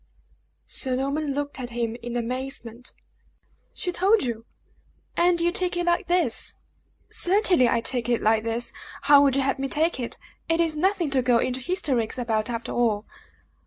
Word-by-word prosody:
Sir 260 -2 +1
Norman 280 +2 -1
looked 285 -1 -4
at 245 -1 -5
him 235 -1 -2
in 240 +1 -4
amazement. 245 -1 -4 0.8
"She 360 - -2
told 390 +4 +3
you, 230 -2 -4 0.7
and 345 0 +3
you 340 +1 +2
take 360 -1 -1
it 350 - 0
like 345 0 +1
this?" 345 -10 +1 0.6
"Certainly, 360 - +4
I 230 - +1
take 245 0 -2
it 235 - +2
like 220 0 +2
this. 230 +1 -2 0.3
How 285 0 +7
would 275 -2 +3
you 275 - +2
have 275 +1 0
me 275 - -1
take 315 +2 0
it? 240 - -4 0.3
It 330 0 +2
is 330 -2 +2
nothing 350 -1 +1
to 265 -2 +2
go 245 -1 +3
into 255 +2 0
hysterics 260 - -1
about, 225 -2 -1
after 230 -1 -4
all!" 220 -3 0
265 Hz, 170 wpm, -25 LUFS, 235-335 Hz, 0.8 s, How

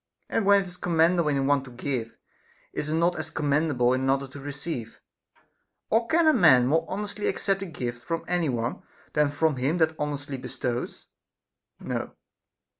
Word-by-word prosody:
And 205 - 0
when 200 -1 +6
it - - -11
is 180 0 -10
commendable 170 -1 +2
in 140 -2 +1
one 140 -1 +2
to 135 - -11
give, 125 -2 -4 0.6
is 150 - -3
it 155 - 0
not 170 +2 +2
as 155 0 -5
commendable 145 -4 +1
in 130 - 0
another 135 +1 +1
to 140 - -10
receive? 140 -4 -6 0.9
Or 230 +1 +3
can 330 +4 +3
a 310 - +6
man 155 - +6
more 155 +6 +2
honestly 205 +1 -3
accept 195 -1 0
a 195 - -4
gift 120 -6 -5
from 165 +4 -3
any 175 -3 +1
one, 120 -1 -2 0.3
than 150 0 +3
from 145 0 +1
him 140 +7 0
that 160 -1 +3
honestly 145 -1 -3
bestows? 125 -1 -4 0.7
No. - - -4
150 Hz, 175 wpm, -26 LUFS, 130-175 Hz, 0.9 s, when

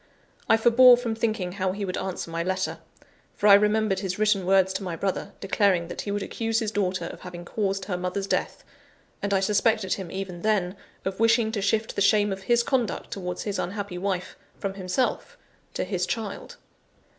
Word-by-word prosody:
I 225 - +6
forbore 240 +2 +7
from 240 -2 -2
thinking 220 -5 -1
how 185 0 -1
he 200 0 -3
would 185 -1 -3
answer 185 -3 -4
my 165 0 -2
letter; 185 +2 -2 0.6
for - - -3
I 205 - +9
remembered 210 -1 +3
his 190 -2 -3
written 210 -3 +2
words 190 0 +4
to - - -3
my 180 -3 -3
brother, 190 +2 -3
declaring 190 -3 +1
that - - -5
he - - -6
would 205 0 -2
accuse 225 +1 -2
his 220 -2 -1
daughter 185 -4 -1
of - - -7
having 175 -1 -8
caused 195 -1 -2
her 180 -3 -2
mother's 180 +2 -2
death; - - -2 0.6
and 200 - -2
I 195 - +3
suspected 210 0 +2
him 190 -3 -5
even 190 -2 -5
then, 195 -3 +1 0.3
of 190 +1 -3
wishing 230 0 +3
to 215 -3 -2
shift 215 +3 0
the - - -1
shame 205 0 +4
of 190 - -7
his 235 +4 +2
conduct 250 -3 -1
towards 180 -2 -4
his 205 -2 -3
unhappy 195 -1 -4
wife 185 -1 -3 0.2
from 195 -1 -3
himself 195 - -2 0.4
to - - -1
his 185 -3 -2
child. 220 -3 -5
195 Hz, 195 wpm, -26 LUFS, 185-215 Hz, 0.6 s, I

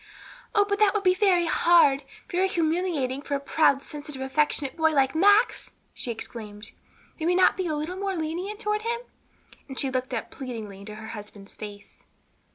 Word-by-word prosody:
"Oh, 410 -1 +5
that 405 0 +3
would 410 - 0
be 365 -1 +5
very 370 -2 +3
hard, 315 -4 +5 0.3
very 370 +2 +1
humiliating 320 -6 0
for 285 - -3
a - - -1
proud, 280 -1 +2
sensitive, 295 -2 -8
affectionate 280 0 0
boy 320 -1 +2
like 270 -2 +3
Max!" 405 +7 +4 0.2
she - - -4
exclaimed. 220 -2 -7 0.5
"May 320 - -1
we 355 - +3
not 370 0 +5
be 370 -1 -2
a 310 - -1
little 315 +5 -4
more 390 0 -2
lenient 345 +6 -3
toward 425 -1 -1
him?" 470 +1 -2 0.7
and 265 -2 -6
she 270 - 0
looked 255 -1 -2
up 225 - -5
pleadingly 225 -7 -7
into 210 +2 -9
her 220 +1 -9
husband's 205 -2 -9
face. 205 -1 -11
310 Hz, 175 wpm, -26 LUFS, 260-370 Hz, 0.7 s, Oh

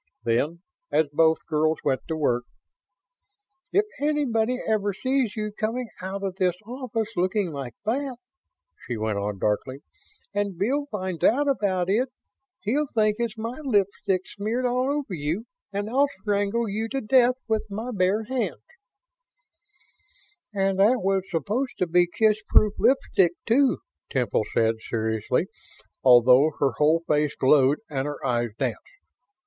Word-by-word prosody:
Then, 150 +10 0 0.3
as 155 -2 +2
both 160 +1 +3
girls 155 0 +1
went 135 -3 +1
to 160 - -2
work: 125 -5 +1 1.3
"If 410 +2 +3
anybody 255 -6 +1
ever 205 -2 0
sees 260 +1 0
you 215 -1 -3
coming 225 +3 -3
out 195 +2 -5
of 190 -1 -3
this 180 -2 +2
office 235 -2 -3
looking 185 +1 0
like 135 -5 -6
that," 260 +4 -1 0.7
she 120 - -3
went 110 -1 -1
on, 100 0 -3
darkly, 120 +7 -1 0.5
"and 200 -3 -1
Bill 275 +10 0
finds 185 - -4
out 285 +5 +4
about 195 -9 +1
it, 235 +7 +1 0.5
he'll 285 +8 0
think 215 -1 +3
it's 235 -2 -2
my 230 +5 -5
lipstick 200 -5 +1
smeared 220 +5 -3
all 250 +2 +1
over 285 -8 -3
you 165 +7 -2 0.3
and 200 +1 -3
I'll 270 +5 +3 0.2
strangle 205 +2 0
you 215 +3 -2
to 270 +2 -2
death 250 +2 +4
with 220 -1 -1
my 220 +5 -4
bare 195 +2 +1
hands!" 255 +2 -3 1.9
"And 195 -1 0
that 225 +4 +4
was 190 0 0
supposed 210 - -2
to 180 - +1
be 175 +1 +3
kissproof 215 +1 +3
lipstick, 190 -9 +3
too," 260 +3 +3 0.3
Temple 120 -5 0
said, 115 0 +2
seriously 110 -1 -1 0.6
although 125 +4 +6
her 140 -2 +2
whole 160 +3 +3
face 150 -2 +1
glowed 135 +1 +4
and 135 -2 -2
her 145 -1 -5
eyes 120 -2 0
danced. - - -2
200 Hz, 145 wpm, -25 LUFS, 155-230 Hz, 1.9 s, although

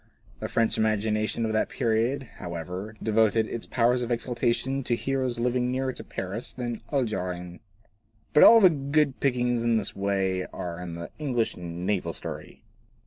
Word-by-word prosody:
The - - -3
French 115 -1 +1
imagination 110 +1 +1
of 110 - -1
that 110 - +1
period, 115 +5 0
how 85 -1 -6
ever, 90 +6 -6
devoted 110 0 +3
its 115 - -6
powers 120 +1 +2
of 120 - -3
exaltation 125 +2 0
to 120 - +1
heroes 130 -1 -1
living 125 +1 +1
nearer 130 0 -1
to - - -8
Paris 100 +6 -5
than 120 -1 -4
the 115 - -8
Algerines. 90 -8 -2 0.7
But 150 - +6
all 230 - +10
the 185 -5 +7
good 140 -1 +1
pickings 125 -3 +1
in 115 -1 +2
this 105 - -3
way 95 -2 0
are 90 0 -6
in 85 -2 -6
the 85 0 -7
English 125 -7 0
naval 90 +1 -2
story. - - -7
115 Hz, 165 wpm, -27 LUFS, 100-125 Hz, 0.7 s, all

